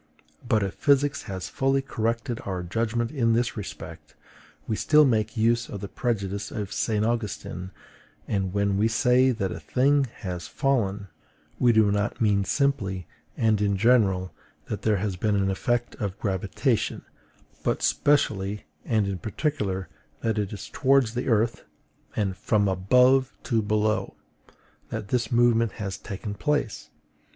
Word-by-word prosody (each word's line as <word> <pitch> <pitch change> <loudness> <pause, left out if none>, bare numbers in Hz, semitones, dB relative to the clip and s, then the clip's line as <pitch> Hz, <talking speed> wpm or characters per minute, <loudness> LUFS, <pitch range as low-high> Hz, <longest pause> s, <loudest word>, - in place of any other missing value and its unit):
But 110 -3 +3
if 95 - -3
physics 140 0 +2
has 95 -4 -4
fully 135 0 +1
corrected 115 0 -2
our 95 -2 -3
judgment 115 +5 -1
in 115 -6 +2
this 120 +1 0
respect, 100 -4 -8 0.5
we 110 - 0
still 150 +6 +5
make 110 -3 0
use 115 +1 +2
of 100 - -6
the 100 - -5
prejudice 100 -3 -2
of 105 -3 -5
St. 110 -1 0
Augustine; 105 -5 -3 0.6
and 95 -2 -1
when 100 0 +1
we 105 +2 +3
say 125 +3 +3
that 105 -7 -1
a - - -5
thing 135 - +2
has 90 -8 -6
FALLEN, 105 - 0 0.5
we 120 - +5
do 110 -2 +4
not 100 0 -1
mean 105 -3 +3
simply 100 - 0 0.3
and 110 -2 +2
in 100 -1 +1
general 100 -5 +3 0.4
that 105 - -3
there 105 -1 +2
has 95 -1 -2
been 105 +2 +1
an 95 -1 +1
effect 120 +5 -1
of 100 -3 -3
gravitation, 95 -4 -1 0.6
but - - 0
specially 105 -8 +1 0.2
and 110 -4 +1
in 95 -2 -3
particular 100 - -2 0.3
that 110 -2 0
it 100 -2 -2
is 105 - -7
towards 135 -4 +2
the 125 +2 -3
earth, 115 -1 +1 0.5
and 95 -3 0
FROM 105 0 +1
ABOVE 125 +8 +3
TO 115 -4 +1
BELOW, 110 0 0 0.7
that 100 - -5
this 120 -2 0
movement 115 -2 +3
has 100 -4 -4
taken 100 0 -6
place. 145 +2 -2
110 Hz, 150 wpm, -26 LUFS, 100-120 Hz, 0.7 s, still